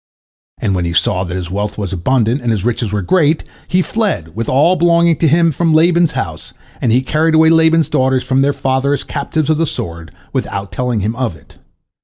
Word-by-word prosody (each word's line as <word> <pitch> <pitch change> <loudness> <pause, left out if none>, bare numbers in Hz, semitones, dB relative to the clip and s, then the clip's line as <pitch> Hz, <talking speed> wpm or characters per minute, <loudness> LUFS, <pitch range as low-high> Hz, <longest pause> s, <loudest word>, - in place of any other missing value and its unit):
And 100 - -1
when 90 -2 -1
he 85 - -2
saw 90 +1 +1
that 90 +1 -4
his 90 -1 -6
wealth 105 +2 -3
was 100 -3 -4
abundant 120 +6 0
and 120 - -2
his 105 -3 -1
riches 120 -3 -1
were 105 -2 -2
great, 155 - +2 0.2
he 185 0 +1
fled 135 - -2
with 115 +1 -3
all 150 +8 +3
belonging 170 -2 +3
to 165 - +2
him 165 +2 +3
from 160 +2 +1
Laban's 170 0 +3
house, - - -5 0.3
and 115 - +1
he 125 +3 +2
carried 160 +4 +1
away 160 0 +5
Laban's 160 0 +3
daughters 130 0 +1
from 130 +1 +1
their 140 +1 +2
father 135 +1 0
as 145 - -2
captives 155 +1 -2
of 155 - +1
the 165 0 0
sword, 85 - -6 0.2
without 100 0 -3
telling 125 -4 -2
him 110 +4 -2
of 125 -8 -2
it. 75 - -21
130 Hz, 215 wpm, -15 LUFS, 105-160 Hz, 0.3 s, away